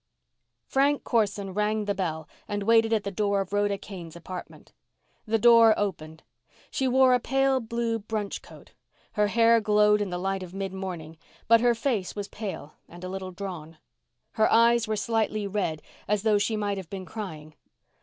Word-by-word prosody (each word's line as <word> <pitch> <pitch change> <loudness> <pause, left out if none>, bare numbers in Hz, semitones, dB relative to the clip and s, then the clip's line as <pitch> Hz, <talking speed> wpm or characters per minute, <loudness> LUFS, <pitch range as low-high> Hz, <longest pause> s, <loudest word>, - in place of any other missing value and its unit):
Frank 280 +2 +1
Corson 205 -4 0
rang 210 +1 0
the 200 - 0
bell 160 -5 -3 0.2
and 205 0 -3
waited 225 +1 +4
at 220 -2 +1
the 200 - -4
door 200 0 0
of 195 0 -4
Rhoda 205 -1 +1
Kane's 175 -5 -10
apartment. 180 +1 -9 0.5
The 225 +1 +2
door 230 -1 +7
opened. 160 -6 -4 0.5
She 265 - 0
wore 260 0 +5
a 250 - +4
pale 270 +2 +1
blue 230 -1 -2
brunch 210 -1 -4
coat. - - -15 0.4
Her 210 0 +1
hair 230 +2 +4
glowed 210 0 +4
in 205 - -2
the 180 - -3
light 195 +1 -2
of 185 0 -9
midmorning, 190 -5 -5 0.3
but 230 0 +6
her 240 -1 +3
face 230 -6 -2
was 205 -1 -4
pale 200 -8 -7 0.2
and 175 +1 -12
a 185 - -5
little 190 0 -5
drawn. 175 -4 -7 0.5
Her 220 - +2
eyes 235 0 +4
were 215 - 0
slightly 215 -1 -1
red, 185 -6 -2 0.2
as 210 -1 0
though 215 -2 +3
she 215 +2 0
might 205 -1 -1
have 185 -4 -7
been 190 -2 -6
crying. 160 -6 -8
205 Hz, 175 wpm, -26 LUFS, 190-225 Hz, 0.5 s, door